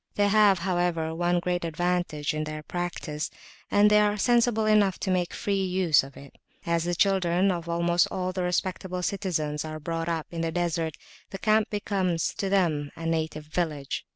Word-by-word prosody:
They 205 0 +3
have, 205 -2 +5
however, 175 -2 -1
one 175 +1 +1
great 175 0 -1
advantage 170 -2 -1
in 155 0 -2
their 155 0 -6
practice, 170 -2 -4 0.4
and 205 +1 +5
they 210 - +6
are 210 0 +2
sensible 235 0 +2
enough 210 -3 +3
to 190 - -1
make 180 -1 0
free 195 -1 -1
use 180 -5 +3
of 135 0 -12
it. 140 0 -14 0.3
As 170 0 0
the 175 0 -1
children 190 0 +2
of 170 -2 -4
almost 170 +1 +2
all 185 0 -2
the 185 - -2
respectable 180 0 -2
citizens 160 -7 -2
are 155 0 -6
brought 165 +2 -3
up 165 -2 -2
in 165 -1 -4
the 165 0 -1
Desert, 165 -2 -1 0.3
the 195 - -6
camp 215 +1 +2
becomes 190 -5 -1
to 195 - -1
them 165 -7 +1
a 165 - -7
native 160 -2 -2
village. 155 -3 -3
175 Hz, 180 wpm, -27 LUFS, 160-190 Hz, 0.4 s, they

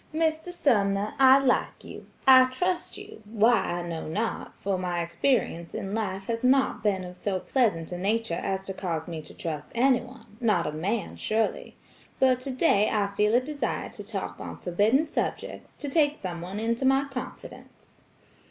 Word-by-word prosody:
"Mr. 320 +1 0
Sumner, 205 - +1
I 265 0 +8
like 270 -2 0
you; - - -10 0.2
I 260 -1 +9
trust 355 +8 -2
you; - - -11
why 220 +2 +3
I 175 -3 -2
know 165 -2 -5
not, 215 +8 -3
for 195 -2 -2
my 180 -1 -2
experience 170 0 -1
in 195 +1 -4
life 195 -3 -2
has 230 +3 -3
not 265 +1 +3
been 200 -3 0
of 180 0 -8
so 190 0 -2
pleasant 205 -10 0
a 175 - -4
nature 215 +1 0
as 190 0 -2
to 195 - -4
cause 165 -5 -3
me 165 -2 -5
to - - -13
trust 150 -3 -5
anyone; 245 -3 0
not 210 -7 +2
a 150 - -2
man, 195 +9 -3
surely. 220 +1 -1 0.4
But 255 -1 +4
today 255 -5 +2
I 205 -2 +1
feel 210 +2 +3
a - - +6
desire 280 -2 -3
to 205 - -9
talk 200 -2 -5
on - - -7
forbidden 210 - +2
subjects, 305 - -4
to 290 - -6
take 295 0 +2
someone 180 +2 -5
into 230 +3 -1
my 270 +1 +3
confidence. 260 -2 -10
215 Hz, 170 wpm, -27 LUFS, 185-260 Hz, 0.4 s, I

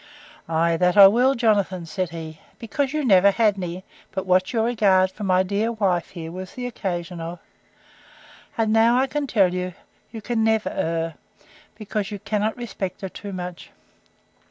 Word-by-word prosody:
Ay, 165 +1 +2
that 180 +2 +2
I 200 - +11
will, 245 +7 +4
Jonathan, 200 -6 +1
said 180 +2 -3
he; 160 -2 -8 0.2
because 260 +4 -2
you 305 -1 -1
never 195 -3 +6
had 210 0 +2
any, 180 0 -5 0.3
but 190 -1 -4
what 185 0 +2
your 225 -3 +1
regard 200 -5 +3
for 210 - -9
my 185 -1 +3
dear 205 +4 -1
wife 190 -6 0
here 165 -1 -8
was 185 +1 -8
the 250 - -5
occasion 180 -7 -4
of. 170 +2 -6 1.2
And 220 -1 +1
now 230 +2 +4
I 260 - +3
can 285 +1 -3
tell 195 -7 +3
you, 180 -1 -3 0.3
you 225 - -8
can 225 +1 -1
never 220 -1 +1
err, 165 0 -2 0.6
because 210 -1 -4
you 205 - -5
cannot 210 +2 -2
respect 200 -6 -5
her 190 - -4
too 200 +2 -8
much. 180 -2 -7
195 Hz, 175 wpm, -23 LUFS, 180-225 Hz, 1.2 s, I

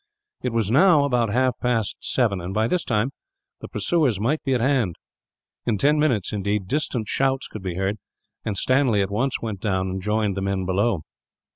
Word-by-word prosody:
It 125 - -1
was 115 -3 0
now 155 +2 +6
about 120 -6 +1
half 125 +1 +1
past 115 -4 0
seven 110 -8 0
and, 90 +3 -5
by 110 +1 +2
this 180 +6 0
time, 115 +3 0 0.5
the - - -8
pursuers 145 - +1
might 135 +9 0
be 135 -2 +1
at - - +1
hand; 120 - +1 0.7
in 110 -3 +2
ten 150 +7 +3
minutes, 125 -12 +1
indeed, 100 -1 -1
distant 125 -4 -1
shouts 135 +2 0
could 110 - -8
be 90 -2 -4
heard, 95 +3 -1 0.4
and 105 -2 -2
Stanley 130 -3 +3
at 95 - -4
once 125 +6 -1
went 110 -4 -4
down 95 -2 -1
and 95 0 -4
joined 105 0 0
the 100 - -3
men 95 -1 -1
below. 95 -1 +1
110 Hz, 190 wpm, -23 LUFS, 100-130 Hz, 0.7 s, now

